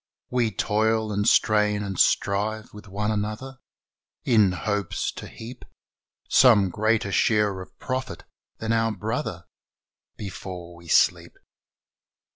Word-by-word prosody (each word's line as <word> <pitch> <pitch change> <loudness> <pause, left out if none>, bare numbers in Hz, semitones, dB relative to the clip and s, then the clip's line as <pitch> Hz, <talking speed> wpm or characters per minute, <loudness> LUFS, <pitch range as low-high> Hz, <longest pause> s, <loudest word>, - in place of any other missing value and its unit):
We 125 -3 +2
toil 110 +1 0
and 105 +1 0
strain 105 -1 +3
and 95 -2 -5
strive 105 +2 +1
with 105 0 -12
one 105 +2 -2
another 110 +6 -4 0.6
In 110 -6 +4
hopes 100 0 -2
to - - -9
heap 120 +3 -10 0.6
Some 105 -8 +5
greater 110 0 0
share 105 -2 +2
of 95 - -13
profit 130 0 -4 0.3
than 110 0 -1
our 115 0 +2
brother 105 - -4 0.7
Before 90 -3 -8
we 85 0 -15
sleep. - - +2
105 Hz, 115 wpm, -25 LUFS, 100-110 Hz, 0.7 s, Some